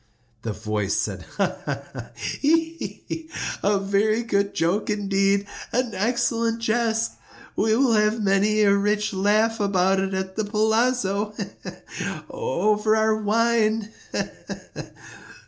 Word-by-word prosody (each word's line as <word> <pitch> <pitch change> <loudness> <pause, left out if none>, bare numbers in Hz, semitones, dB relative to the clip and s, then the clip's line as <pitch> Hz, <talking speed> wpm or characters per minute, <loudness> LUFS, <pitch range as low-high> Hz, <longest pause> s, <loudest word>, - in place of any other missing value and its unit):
The 115 - -3
voice 105 -2 -1
said— - - -3
"Ha! - - 0
ha! - - -3
ha!—he! 325 +2 -2
he!—a 305 -10 -2
very 200 +3 +1
good 200 -3 0
joke 180 +7 +1
indeed—an 200 +4 0
excellent 230 +1 0
jest. 230 0 +1 0.4
We 220 +1 +2
will 265 -2 +3
have 215 0 +3
many 205 +1 +2
a 200 -1 +5
rich 210 +1 +1
laugh 215 +4 +2
about 195 -1 +2
it 195 0 -1
at 190 0 -3
the 220 - 0
palazzo—he! 215 -1 +1 0.2
he! - - -8
he!—over 215 - 0
our 220 0 +3
wine—he! 220 0 0
215 Hz, 110 wpm, -24 LUFS, 200-230 Hz, 0.4 s, a